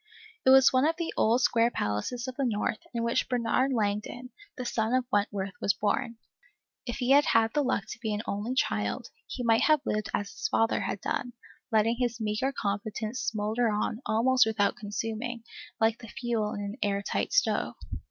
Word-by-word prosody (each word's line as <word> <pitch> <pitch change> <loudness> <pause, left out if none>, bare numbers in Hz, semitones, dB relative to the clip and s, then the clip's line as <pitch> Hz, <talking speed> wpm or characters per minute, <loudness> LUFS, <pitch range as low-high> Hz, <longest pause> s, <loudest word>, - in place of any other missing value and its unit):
It - - +8
was 265 0 +7
one 260 +3 +4
of 325 - +1
the 335 -1 -3
old 235 +3 +3
square 230 -1 +3
palaces 235 - -2
of 255 - -5
the 275 - -1
North, 215 -2 -1
in 235 -1 -2
which 235 0 0
Bernard 250 +2 +1
Langdon, 220 +2 -2 0.3
the 250 - -4
son 230 0 0
of 255 -1 +1
Wentworth, 200 -2 0
was 200 - +2
born. 230 +2 -1 0.7
If 240 - -2
he 250 0 0
had 285 +1 +6
had 225 0 +3
the 295 - +2
luck 255 -6 0
to - - -7
be 220 -2 -2
an 210 +1 -2
only 210 +6 -3
child, 105 - -1 0.2
he 250 - -5
might 225 -1 +4
have 305 -2 +4
lived 215 0 -1
as 205 -1 -2
his - - -3
father 225 - +2
had 200 - -3
done, 245 0 -2 0.4
letting 225 +2 +3
his 240 -2 -1
meagre 215 +5 -1
competence 215 +1 -3
smoulder 220 +2 0
on 215 +2 -1
almost 245 +2 +4
without 205 -2 +1
consuming, 225 +3 -4 0.4
like 225 +1 +2
the 230 - -10
fuel 225 -2 -2
in 205 - -4
an 205 +3 -5
air 200 -1 0
tight - - -2
stove. - - +1
230 Hz, 190 wpm, -28 LUFS, 210-250 Hz, 0.7 s, It